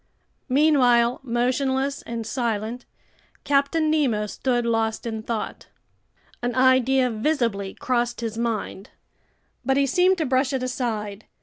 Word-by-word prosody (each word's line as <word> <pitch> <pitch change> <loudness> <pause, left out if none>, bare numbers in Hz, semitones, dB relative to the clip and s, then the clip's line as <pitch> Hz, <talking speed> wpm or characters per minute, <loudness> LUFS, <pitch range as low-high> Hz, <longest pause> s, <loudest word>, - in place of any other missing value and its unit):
Meanwhile, 250 -4 +4
motionless 265 +2 0
and 230 -1 -5
silent, 230 0 -3 0.6
Captain 290 +3 +2
Nemo 255 -9 +1
stood 240 +3 -1
lost 225 -1 0
in 220 -2 -3
thought. 225 0 -5 0.7
An 245 -1 -2
idea 260 0 +4
visibly 225 -5 -1
crossed 240 -1 -1
his 225 -2 -3
mind. 225 -3 -3 0.7
But 270 0 +1
he 280 - +3
seemed 365 +7 +3
to 320 - 0
brush 260 0 +1
it 260 -1 -1
aside. 220 -5 -3
245 Hz, 120 wpm, -24 LUFS, 225-270 Hz, 0.7 s, Meanwhile